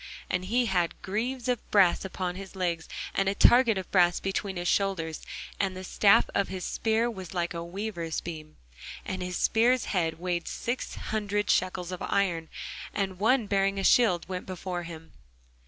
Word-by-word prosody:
And 180 0 -1
he 240 +5 +2
had 180 -5 0
greaves 235 +6 -2
of 245 -3 -1
brass 195 -4 +4
upon 185 -1 -3
his 195 +1 -9
legs, 175 -3 -2 0.2
and 195 0 +1
a 200 - -1
target 240 -2 +6
of 190 - -5
brass 175 -2 +4
between 195 0 -2
his 175 0 -3
shoulders. 175 -5 0 0.4
And 190 -2 0
the 185 - -6
staff 200 +2 +4
of 200 - +1
his 185 -1 -5
spear 225 +1 +1
was 190 -6 -7
like 175 0 -1
a 170 0 -4
weaver's 170 -2 -4
beam; 155 -2 -8 0.5
and 185 0 -4
his 180 -1 -3
spear's 240 +2 +3
head 165 -4 0
weighed 175 -1 -2
six 240 +2 -3
hundred 205 -1 -1
shekels 185 -1 0
of 180 - -6
iron: 170 -5 0 0.5
and 190 -2 -2
one 230 +3 +3
bearing 195 0 +1
a 195 - -1
shield 190 -7 +4
went 180 -1 -5
before 185 -1 -4
him. 165 -1 -9
190 Hz, 175 wpm, -28 LUFS, 175-205 Hz, 0.5 s, target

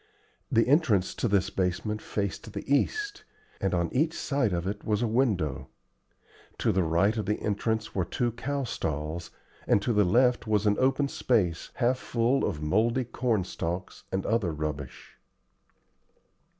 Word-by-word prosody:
The 115 -2 +4
entrance 125 - +3
to - - -1
this 100 -3 +1
basement 95 +4 -1
faced 100 -2 -4
the - - -5
east, 410 - 0 0.4
and 95 - +1
on 85 -1 -1
each 155 +5 +1
side 135 -7 0
of 85 -1 -1
it 100 +2 -4
was 105 +1 0
a - - +2
window. 105 - 0 0.9
To - - +2
the 95 - +2
right 85 +6 +2
of 110 - -3
the 105 - 0
entrance 110 +1 -1
were 95 - +1
two 120 +7 -1
cow 140 +4 -3
stalls, 80 - -3 0.4
and - - +4
to 120 - +1
the 105 -1 +4
left 120 +5 +3
was 105 -1 +2
an 105 -1 +3
open 135 +2 +2
space 100 -12 0
half 125 0 +1
full 120 +3 +1
of 75 0 -2
mouldy 115 +10 +2
corn 115 -4 0
stalks 90 +1 -5
and 95 0 -1
other 110 -6 +1
rubbish. 75 -3 -6
105 Hz, 160 wpm, -28 LUFS, 90-125 Hz, 0.9 s, The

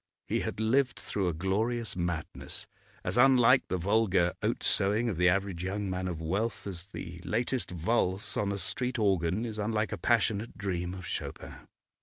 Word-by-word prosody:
He - - 0
had - - -4
lived 120 +3 +2
through 100 -3 -2
a 85 - 0
glorious 110 +7 0
madness, 85 -2 -3 0.4
as 120 - 0
unlike 130 -1 +6
the 95 - -1
vulgar 95 -2 +2
oat - - -1
sowing 105 +5 +2
of 95 - -3
the 90 +1 +5
average 95 -2 0
young 100 +1 -2
man 90 0 -2
of 85 -3 -3
wealth 100 +7 -2
as 90 -2 -5
the 85 -3 -8
latest 120 +5 -1
valse 95 +2 0
on 100 -1 0
a 100 - -2
street 125 +7 -2
organ 95 0 +1
is 110 -2 -5
unlike 105 0 0
a - - -4
passionate 115 -1 +1
dream 90 -2 -2
of 95 -1 -8
Chopin. - - -5
100 Hz, 175 wpm, -30 LUFS, 90-115 Hz, 0.4 s, unlike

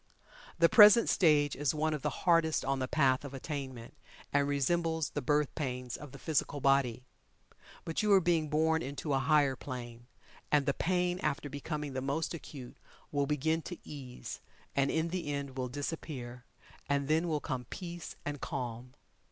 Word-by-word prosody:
The 170 0 +6
present 210 +4 +8
stage 150 -5 +4
is 145 -1 0
one 155 +1 +1
of 150 - -3
the - - 0 0.2
hardest 165 -3 +3
on 135 0 0
the 130 - -1
Path 135 -2 +2
of 140 -1 -7
Attainment, 130 -4 -6 0.4
and 140 0 +3
resembles 160 +3 0
the - - -3
birth 145 +2 +1
pains 125 -5 -3
of 145 -3 -9
the 140 - -10
physical 145 -1 -1
body. 135 -3 +2 0.8
But 165 - -1
you 210 -1 +2
are 195 - +8
being 165 -4 +1
born 160 +2 +2
into 140 +1 -3
a 135 - +3
higher 145 -2 +3
plane, 120 -2 -8 0.4
and 145 -2 +4
the 140 - +2
pain 180 +2 0
after 145 -2 -2
becoming 150 0 -4
the 130 - -2
most 140 +6 -1
acute 140 -6 -9 0.3
will 145 -1 0
begin 160 +3 +1
to 175 +2 -7
ease, 130 -4 -8 0.3
and 140 0 +2
in 160 +1 0
the 170 -4 -3
end 140 -2 -4
will 130 -1 -3
disappear, 130 -3 -5 0.4
and 140 -1 +1
then 160 +3 +2
will 155 -2 0
come 130 -3 -4
peace 175 +4 -7
and 145 -1 -4
calm. 125 0 -5
145 Hz, 175 wpm, -32 LUFS, 130-160 Hz, 0.8 s, present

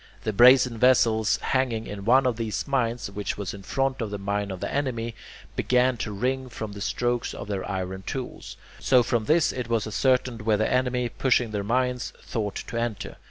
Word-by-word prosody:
The 110 - -1
brazen 125 +1 +6
vessels 115 -3 +4
hanging 125 -4 -1
in 100 -1 -7
one 130 +4 +5
of 125 -2 +1
these 110 -3 -3
mines, 120 -5 -1
which 100 0 -4
was 100 -3 -4
in 100 - -9
front 135 +6 -1
of 110 -3 -3
a 105 - -3
mine 100 +1 -2
of 95 -1 -5
the - - -4
enemy, 120 -5 -2 0.4
began 125 0 +2
to 110 - -4
ring 130 +5 -2
from 110 -3 -6
the 100 0 -9
strokes 120 +2 -1
of - - -7
their 100 -2 -3
iron 95 0 -3
tools. 130 +6 -6 0.2
So 125 -2 +4
from 120 -2 0
this 160 +3 +3
it 125 -2 -5
was 115 -2 +1
ascertained 125 +1 +1
where 105 -1 +2
the 110 - +1
enemy, 125 -1 +1
pushing 120 -1 +1
their 105 -1 -2
mines, 125 +3 -1
thought 105 -3 -4
to 115 - -5
enter. 115 -4 -3
115 Hz, 200 wpm, -25 LUFS, 105-125 Hz, 0.4 s, brazen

